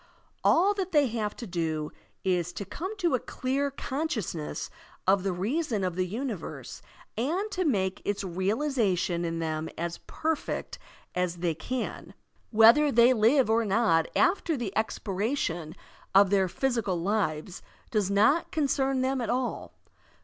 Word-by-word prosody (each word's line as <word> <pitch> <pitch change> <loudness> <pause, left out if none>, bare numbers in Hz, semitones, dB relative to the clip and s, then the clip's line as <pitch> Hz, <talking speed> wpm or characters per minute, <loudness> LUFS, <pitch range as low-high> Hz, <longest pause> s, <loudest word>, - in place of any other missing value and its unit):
All 390 +5 +4
that 380 -3 -4
they 295 -2 +5
have 215 -2 -2
to 240 - -7
do 160 -5 -2 0.3
is 180 -2 0
to 200 +4 -5
come 375 - -5
to 345 -6 +1
a 255 - +3
clear 270 +4 -2
consciousness 260 - -3 0.3
of 195 +1 +4
the 195 0 -1
reason 215 - -1
of 180 -2 -1
the 185 0 0
universe 225 -1 -5 0.3
and 345 - -1
to 370 -2 -1
make 190 -9 0
its 205 0 -2
realization 190 - 0
in 165 -1 -2
them 160 -1 -2
as 170 +1 -3
perfect 320 -1 -3 0.3
as 180 -1 -1
they 170 -1 -1
can. 245 +11 -5 0.3
Whether 235 +7 +6
they 235 +1 +6
live 245 +3 +4
or 225 +1 +3
not 200 -6 +2
after 340 -4 +2
the 225 -6 -4
expira 220 +3 -1
tion 165 - -3 0.4
of 200 0 +6
their 195 -2 +3
physical 220 -4 -1
lives 180 -2 -1 0.3
does 210 -5 +1
not 220 +11 +3
concern 270 -3 +1
them 260 0 0
at 230 - -3
all. 250 0 -2
215 Hz, 150 wpm, -28 LUFS, 180-270 Hz, 0.4 s, Whether